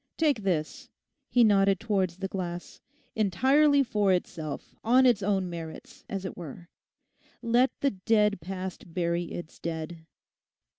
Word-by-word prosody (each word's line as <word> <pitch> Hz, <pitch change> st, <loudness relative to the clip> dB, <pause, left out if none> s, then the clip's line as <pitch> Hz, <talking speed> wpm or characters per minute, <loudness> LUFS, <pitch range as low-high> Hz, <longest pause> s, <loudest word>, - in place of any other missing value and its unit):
Take 295 Hz, -8 st, +2 dB
this,' 170 Hz, -6 st, -2 dB, 0.4 s
he 245 Hz, -, +5 dB
nodded 195 Hz, -3 st, +4 dB
towards 190 Hz, -6 st, 0 dB
the 195 Hz, 0 st, -3 dB
glass, 175 Hz, -2 st, -6 dB, 0.3 s
'entirely 270 Hz, -, +4 dB
for 210 Hz, -6 st, +1 dB
itself, 165 Hz, -4 st, -3 dB
on 255 Hz, +3 st, +5 dB
its 240 Hz, -5 st, +4 dB
own 195 Hz, -1 st, +1 dB
merits, 165 Hz, -2 st, -8 dB
as 195 Hz, -2 st, -4 dB
it -, -, -5 dB
were. 170 Hz, +1 st, -9 dB, 0.7 s
Let 240 Hz, +3 st, +4 dB
the 275 Hz, -, +2 dB
dead 210 Hz, -1 st, +2 dB
past 185 Hz, +1 st, -7 dB
bury 170 Hz, -1 st, 0 dB
its 170 Hz, -1 st, -8 dB
dead. 160 Hz, 0 st, -5 dB
190 Hz, 135 wpm, -28 LUFS, 175-225 Hz, 0.7 s, he